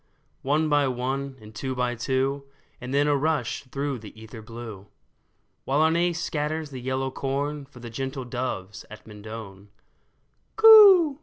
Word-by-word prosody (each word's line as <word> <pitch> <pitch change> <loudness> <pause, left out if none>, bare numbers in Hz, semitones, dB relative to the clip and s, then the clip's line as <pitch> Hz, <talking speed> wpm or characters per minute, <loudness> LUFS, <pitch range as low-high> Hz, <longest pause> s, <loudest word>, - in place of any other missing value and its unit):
One 150 +3 +1
by 145 -2 +2
one, 130 +2 -3
and 110 0 -14
two 130 +4 -4
by 125 -1 -1
two, 135 +3 -1 0.4
And 125 0 -6
then 140 +1 +2
a 145 -1 +2
rush 140 -3 -1
through 140 0 -4
the 110 0 -13
ether 110 0 -11
blue; 110 -3 -10 0.8
While 140 +2 0
Arne 170 +2 +2
scatters 155 -1 -3
the 130 -2 -7
yellow 130 +1 -2
corn 140 +2 -3
For 125 -3 -15
the 120 -1 -8
gentle 130 +2 -5
doves 120 -6 -5
at 110 0 -12
Mendon. 105 -2 -10 0.4
'* - - -45
Coo 390 -10 +8
130 Hz, 155 wpm, -25 LUFS, 115-145 Hz, 0.8 s, Coo